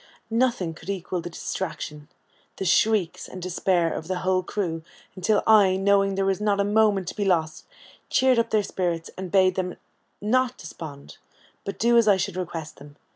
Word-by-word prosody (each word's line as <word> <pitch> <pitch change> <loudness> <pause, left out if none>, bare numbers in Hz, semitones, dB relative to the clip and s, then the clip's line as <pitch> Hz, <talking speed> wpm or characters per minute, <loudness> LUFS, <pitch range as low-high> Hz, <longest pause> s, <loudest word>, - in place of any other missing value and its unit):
Nothing 230 -8 +1
could 160 - -12
equal 185 -2 -3
the 175 - -6
distraction, 150 -4 -5 0.5
the 190 - -4
shrieks, 190 -1 +2
and 185 - -9
despair 180 -1 0
of 160 - -6
the 185 0 -1
whole 185 0 +2
crew, 175 -4 -3 0.3
until 200 +3 +1
I, 205 -4 +6
knowing 195 0 +2
there 195 0 0
was 195 +1 0
not 205 -1 +1
a - - +4
moment 205 -2 +2
to - - -8
be 210 - -1
lost, 165 -5 0 0.4
cheered 260 -2 +4
up 230 0 +1
their 215 -1 +2
spirits, 175 -4 -2
and 185 -1 -6
bade 185 -2 +4
them 180 -1 -3 0.4
not 250 +4 +1
despond, 150 -4 -10 0.4
but 200 - -5
do 235 +1 +4
as 230 - +2
I 200 -2 +6
should 185 - -2
request 165 -3 -5
them. 145 +1 -14
190 Hz, 180 wpm, -25 LUFS, 175-210 Hz, 0.5 s, I